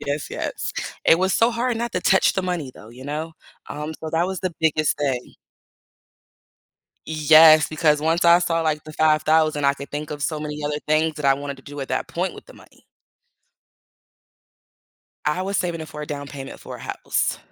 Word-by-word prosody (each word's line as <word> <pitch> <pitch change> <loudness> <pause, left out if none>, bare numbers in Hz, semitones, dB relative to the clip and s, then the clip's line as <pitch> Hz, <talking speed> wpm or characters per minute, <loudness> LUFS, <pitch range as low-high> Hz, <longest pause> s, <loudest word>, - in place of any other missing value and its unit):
yes, 145 +1 -4
yes. - - -4 0.3
It 165 - +6
was 190 +1 +1
so 230 +1 +4
hard 240 0 -1
not 235 0 -3
to 180 - -1
touch 190 +1 +3
the 190 - +1
money 175 -7 -3
though, 110 - -14
you 130 +2 -12
know? 155 +3 -4 0.4
Um, 150 +2 -5
so 160 - -4
that 165 +2 +1
was 190 -1 -4
the 185 -3 -3
biggest 155 -1 +2
thing. 135 -4 -2 1.7
Yes, 155 0 +6
because 150 -1 +2
once 165 +3 +1
I 170 +1 +7
saw, 165 -2 0
like, 155 -2 -1
the 155 - -10
$5,000 155 -1 +2
I 140 - +3
could 140 0 -10
think 150 +1 -5
of 145 -1 -5
so 155 +1 -2
many 150 0 -5
other 150 0 -1
things 155 +1 +2
that 150 -2 -2
I 135 - +5
wanted 140 0 -6
to 135 - -16
do 145 0 -10
at 135 - -5
that - - -2
point - - -2
with - - -13
the - - -15
money. - - -20 2.4
I 150 +5 0
was 195 +1 -2
saving 170 -2 -2
it 155 - -7
for 150 - -7
a - - -6
down 145 -1 -5
payment 135 -1 -9
for - - -8
a - - -14
house. - - -2
155 Hz, 200 wpm, -22 LUFS, 145-165 Hz, 2.4 s, I